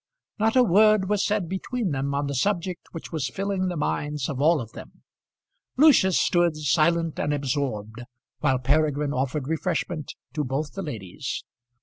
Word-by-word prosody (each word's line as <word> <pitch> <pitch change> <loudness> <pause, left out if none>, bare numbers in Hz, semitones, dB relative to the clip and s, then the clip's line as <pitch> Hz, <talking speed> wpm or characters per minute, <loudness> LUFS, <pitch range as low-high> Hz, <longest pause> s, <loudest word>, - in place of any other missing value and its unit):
Not 220 +2 +2
a 255 - +7
word 215 -1 +4
was 210 -1 +2
said 205 -4 0
between 190 +3 -3
them 140 0 -1
on 140 +1 0
the 140 - -3
subject 180 +4 -1
which 165 - -8
was 150 -6 -2
filling 195 +2 -2
the 175 -2 -3
minds 145 - -2
of 140 -3 -3
all 160 +2 +4
of 115 -3 -7
them. - - -12 0.7
Lucius 265 - +5
stood 175 -3 +2
silent 165 +2 +1
and 145 - 0
absorbed 125 -6 -2 0.4
while 135 -1 +2
Peregrine 145 +2 +1
offered 135 +1 -2
refreshment 160 -1 -2 0.2
to 150 - -1
both 140 +3 -3
the 195 - -4
ladies. 110 - -5
155 Hz, 160 wpm, -25 LUFS, 140-185 Hz, 0.7 s, a